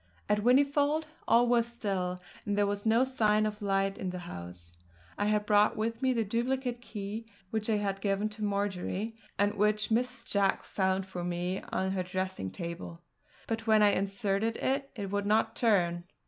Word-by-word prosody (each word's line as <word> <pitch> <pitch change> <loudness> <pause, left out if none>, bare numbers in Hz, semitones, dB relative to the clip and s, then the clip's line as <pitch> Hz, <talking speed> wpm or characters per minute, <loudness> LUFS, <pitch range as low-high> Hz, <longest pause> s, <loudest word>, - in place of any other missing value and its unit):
At 210 0 +2
Whinnyfold 285 +6 +3 0.2
all 235 +1 +5
was 235 -1 +3
still, 190 -6 -3 0.2
and 205 -1 -1
there 205 - +4
was 205 +1 -2
no 230 +3 +5
sign 215 -5 +2
of 210 0 -3
light 195 -1 0
in 185 - -2
the 180 - -4
house. 85 - -8 0.4
I 205 - -1
had 210 0 +1
brought 210 0 +4
with 225 +1 -2
me 260 -1 +3
the 230 -3 +1
duplicate 245 +3 -1
key 215 0 -6 0.2
which 220 0 -2
I 215 - +3
had 195 -1 -2
given 200 +1 +1
to 215 0 -7
Marjory, 205 +1 -2 0.2
and 205 +1 +2
which 210 +1 +2
Mrs. 250 +3 -1
Jack 200 -1 +2
found 190 -1 0
for 185 -2 -6
me 180 +1 -2
on 190 0 0
her 190 -1 0
dressing 185 - -3
table; 170 - -7 0.4
but 225 0 -3
when 215 -1 +6
I 205 - +7
inserted 200 +3 0
it, 275 +1 -1
it 200 -4 -5
would 205 0 -1
not 215 +2 +2
turn. 175 -7 +2
205 Hz, 180 wpm, -30 LUFS, 190-225 Hz, 0.4 s, I